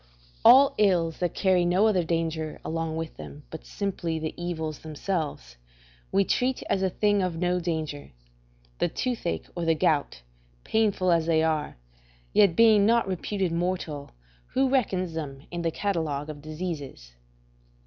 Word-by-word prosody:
All 270 +2 +8
ills 175 -6 +2
that 175 -2 -1
carry 185 -2 +3
no 180 +4 +3
other 195 -5 +3
danger 160 -1 -2
along 165 0 -2
with 160 0 -5
them 145 - -10
but 160 - -9
simply 175 -5 -3
the 160 0 -4
evils 160 -3 -4
themselves, 155 - -4 0.5
we 195 0 +3
treat 255 +5 0
as 190 - +1
things 205 -2 +2
of 180 -2 -2
no 180 +1 +1
danger: 160 -4 -4 0.7
the - - +2
toothache 175 - -3
or 175 - -3
the 165 -1 +2
gout, 145 - 0 0.4
painful 205 -5 +1
as 165 -1 +2
they 160 -1 +3
are, 155 - -1 0.6
yet 200 -5 +5
being 220 -2 +6
not 230 0 +3
reputed 190 0 -2
mortal, 170 -4 -2 0.4
who 265 +1 +1
reckons 190 -10 0
them 140 -4 -6
in 175 0 -3
the 165 - 0
catalogue 160 -5 -2
of 145 -1 -11
diseases? 155 - -6
170 Hz, 150 wpm, -26 LUFS, 155-195 Hz, 0.7 s, All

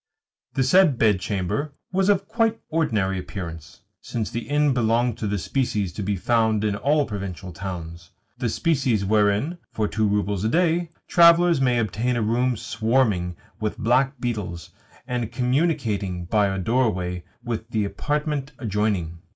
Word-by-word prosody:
The 135 - +2
said 155 0 +5
bedchamber 105 +6 0 0.2
was 190 +1 +2
of 195 -1 +2
quite 225 -1 +1
ordinary 105 - 0
appearance, 85 -5 -8 0.2
since 110 -3 -4
the 115 +3 -5
inn 145 -1 +3
belonged 120 -1 +1
to 110 - -2
the 100 0 -1
species 105 -3 -1
to 95 - -5
be 100 +1 -1
found 110 +1 +1
in 105 -2 +1
all 145 +6 +2
provincial 95 -4 -6
towns 85 -2 -7 0.3
the 125 -2 -2
species 130 - +1
wherein, 105 - +2
for 110 -1 -1
two 110 0 0
roubles 100 -1 0
a 110 - +1
day, 170 +3 +2 0.2
travellers 170 -2 +6
may 125 -2 +3
obtain 115 +2 0
a 120 - 0
room 120 +2 +1
swarming 110 -6 0 0.2
with 110 -1 -2
black 125 +4 +2
beetles, 105 -9 -4 0.3
and 120 -3 -3
communicating 125 - 0
by 105 +2 +2
a 95 0 -2
doorway 95 -5 0 0.2
with 115 -2 -4
the 110 -3 0
apartment 145 +7 -2
adjoining. 100 -7 -1
110 Hz, 150 wpm, -24 LUFS, 100-135 Hz, 0.3 s, travellers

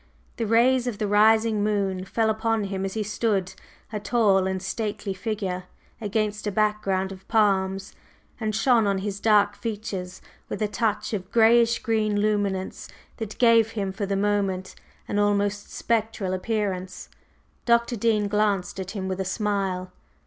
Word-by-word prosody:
The 230 - -1
rays 245 +3 +3
of 230 -4 -2
the 215 - -1
rising 215 +1 +4
moon 195 -3 0
fell 220 +2 +1
upon 220 0 0
him 195 -1 -3
as 195 - -4
he 220 - 0
stood, 200 -3 -1 0.4
a 210 - -1
tall 205 -3 +2
and 190 0 -1
stately 200 +1 -3
figure, 190 -2 -3 0.4
against 210 0 -1
a - - 0
background 200 -2 0
of 190 0 -11
palms, 195 -3 +1 0.5
and 215 -2 -2
shone 230 -2 +3
on 200 -1 +1
his 200 +1 -4
dark 205 -1 +3
features 200 -5 -5 0.3
with - - -4
a 215 - +1
touch 220 +1 -1
of 190 -2 -4
grayish 235 +1 +5
green 215 -2 +1
luminance 205 -3 -1 0.3
that 220 -2 -6
gave 230 -2 +4
him 195 -3 -2
for 200 +1 -4
the 200 - 0
moment 195 -2 0 0.3
an 205 - -1
almost 205 0 +1
spectral 220 -4 -1
appearance. 185 -2 -3 0.6
Dr. 235 +1 +3
Dean 215 -1 +1
glanced 200 -3 0
at 190 -1 -5
him 190 -1 -3
with 190 0 -2
a - - 0
smile. 190 -2 -2
205 Hz, 155 wpm, -25 LUFS, 195-220 Hz, 0.6 s, grayish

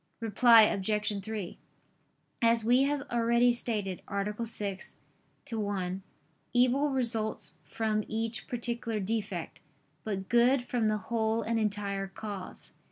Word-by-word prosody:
Reply 230 +1 +6
Obj. 210 0 0
3: 210 -4 -5 0.8
As 230 -1 +4
we 245 +4 +4
have 285 0 -1
already 235 +1 +3
stated 210 -6 0
(A. 210 +3 -2
6, 200 -4 -3 0.6
ad 225 - -2
1), 190 -3 -2 0.5
"evil 255 +4 +3
results 230 -5 -2
from 215 -1 -1
each 225 +1 -3
particular 235 -2 -2
defect, 200 -4 -3 0.4
but 195 -2 -3
good 245 +2 +4
from 245 -3 0
the 215 0 +1
whole 220 +2 -1
and 230 0 0
entire 200 -2 -2
cause." 195 -1 -8
220 Hz, 120 wpm, -30 LUFS, 205-235 Hz, 0.8 s, Reply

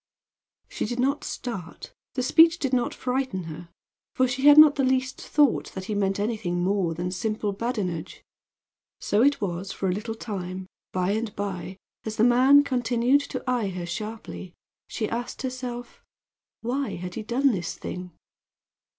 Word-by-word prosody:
She - - -3
did 240 +3 -4
not 275 +3 +1
start; 195 -9 -6 0.2
the 255 - 0
speech 330 +5 +6
did 270 -6 -2
not 245 -1 +2
frighten 255 -7 -2
her, 165 +1 -8 0.5
for 255 - +3
she 260 +3 +1
had 290 0 +9
not 305 -1 +10
the 280 - 0
least 260 0 0
thought 295 -4 +2
that 190 - -5
he 215 - -3
meant 195 -1 0
anything 205 -5 -1
more 185 -3 +1
than 175 +2 -3
simple 215 +2 -2
badinage. 195 -6 -3 0.8
So 205 - +1
it 285 +3 +4
was 190 0 -3
for 195 - -2
a - - +2
little 220 +4 -3
time; 190 -4 -5 0.3
by 185 +1 0
and 220 0 -2
by, 190 -2 -4 0.3
as 220 -1 -4
the 220 - +2
man 260 +4 +6
continued 250 +1 +2
to - - -5
eye 245 -5 +1
her 180 -2 -5
sharply, 205 -1 -6 0.3
she 215 - -2
asked 240 +3 -4
herself 250 -2 -6 0.6
why 260 +4 -2
had 180 +1 -6
he 225 - -4
done 250 +5 +2
this 175 -6 -3
thing? 180 0 -6
225 Hz, 165 wpm, -26 LUFS, 190-255 Hz, 0.8 s, not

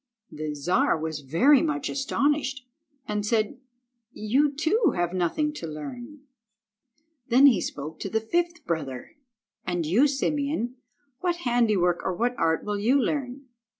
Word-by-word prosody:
The 150 -1 -5
Czar 160 +3 +1
was 160 -1 -3
very 170 - +4
much 300 -4 -1
astonished, 280 -1 -1 0.4
and 210 -1 -2
said— 215 +2 0 0.5
"You, 260 +8 +1
too, 320 - +1
have 175 0 -1
nothing 185 - 0
to 170 - -6
learn." 240 - -8 1.1
Then 255 +4 +6
he 235 -10 +6
spoke 150 +2 -6
to 195 - -4
the 220 - +1
fifth 345 +7 -2
brother— 140 - -4 0.5
"And 175 -2 -2
you, 215 - +4
Simeon, 280 -2 -1 0.4
what 355 -2 0
handiwork 215 -8 +2
or 185 - -1
what 240 +5 0
art 160 0 +1
will 205 -1 -2
you 250 +7 +3
learn?" 270 0 -2
235 Hz, 140 wpm, -26 LUFS, 175-285 Hz, 1.1 s, Then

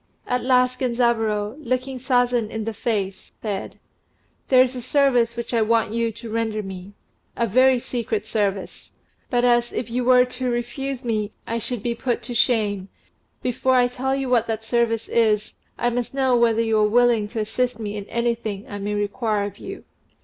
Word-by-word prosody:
At 250 0 -1
last 255 0 +3
Genzaburô, 235 -3 0
looking 255 -1 -2
Sazen 245 -3 +1
in 220 0 -4
the 225 - -3
face, 200 -4 -3
said, 205 -3 -4 0.7
"There 255 -1 +7
is 255 0 -3
a 250 - -4
service 245 -3 +2
which 235 +1 -4
I 230 - +3
want 225 0 +2
you 230 0 0
to 230 0 -9
render 220 -1 -1
me 190 0 -8 0.4
a 235 - +2
very 255 +4 +4
secret 230 -3 -3
service; 200 -3 -2 0.4
but 245 -1 +1
as 240 -1 +3
if 230 - -4
you 250 +1 0
were 250 0 +6
to 250 0 -3
refuse 250 +2 -3
me, 215 -3 -1
I 230 +1 -2
should 230 -1 -4
be 240 - 0
put 240 0 -2
to 240 +1 -5
shame, 210 -5 +1 0.5
before 255 +1 +1
I 245 -1 +5
tell 260 +2 -2
you 270 -1 -2
what 240 -2 +2
that 225 -1 -3
service 230 -1 +1
is, 215 -2 +2 0.2
I 240 - +1
must 245 +2 -3
know 265 -2 +3
whether 230 -1 +3
you 225 -1 +2
are 210 0 +3
willing 235 -2 +3
to 225 +2 -5
assist 235 +2 -1
me 210 -2 -4
in 205 -1 -5
anything 230 -3 -2
that - - -15
I 205 - -5
may 205 +1 -2
require 205 +1 -1
of 200 0 -6
you." 390 +1 -8
235 Hz, 190 wpm, -23 LUFS, 215-250 Hz, 0.7 s, There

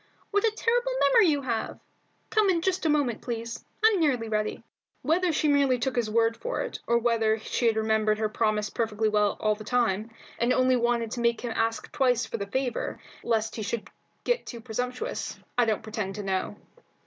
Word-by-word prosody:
What 410 -1 +2
a 450 - +5
terrible 485 +2 +1
memory 455 -6 +5
you 290 -3 +1
have! 230 -3 -3 0.5
Come 430 -2 +3
in 340 -3 +1
just 370 -3 0
a - - +2
moment, 285 -6 +1
please; 230 -1 -5 0.2
I'm 435 -4 +5
nearly 255 -8 +1
ready." 215 0 -2 0.4
Whether 350 +3 +2
she 310 0 +1
merely 280 -3 +3
took 260 +2 -2
his 235 -3 0
word 230 +1 +2
for - - -3
it, - - -5
or 235 - +4
whether 225 -2 +2
she 230 +2 -1
had 225 - +3
remembered 220 -1 +2
her 215 0 0
promise 215 -1 0
perfectly 220 -2 0
well 210 -1 +2
all 215 0 +2
the 215 +1 -8
time, 220 -2 0 0.3
and 240 +2 +3
only 255 0 +3
wanted 235 -2 0
to 245 - -4
make 235 -1 +1
him 240 -2 -3
ask 225 0 -1
twice 250 -3 +2
for 230 - -4
the 200 -2 -4
favour, 260 +3 -2 0.2
lest 220 -1 0
he - - -3
should 210 0 -4 0.3
feel 485 - +3
too 235 - -8
presumptuous, 250 - -4 0.2
I 245 - +4
don't 220 0 0
pretend 210 -3 -4
to 210 - -5
know. 190 +1 -2
235 Hz, 200 wpm, -27 LUFS, 220-270 Hz, 0.5 s, a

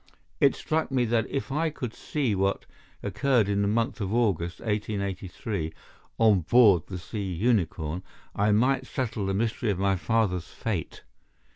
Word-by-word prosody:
It - - +4
struck 160 +1 -1
me 130 -3 +1
that 115 0 +1
if 135 0 -3
I 160 +3 +1
could 125 -6 -5
see 135 -8 -1
what 95 0 0 0.4
occurred 110 +3 +2
in 100 0 +1
the 100 - +1
month 115 +3 0
of 100 -1 -2
August, 95 -7 0
1883, 100 -4 -3 0.5
on 110 -4 +5
board 100 -1 +5
the 95 - -5
Sea 100 +1 -5
Unicorn, 90 -5 0 0.3
I 105 +1 +2
might 130 +5 +2
settle 110 -6 -2
the 95 - 0
mystery 115 +2 0
of 100 - 0
my 95 0 +2
father's 95 -3 0
fate. 100 -8 -4
105 Hz, 155 wpm, -27 LUFS, 95-120 Hz, 0.5 s, on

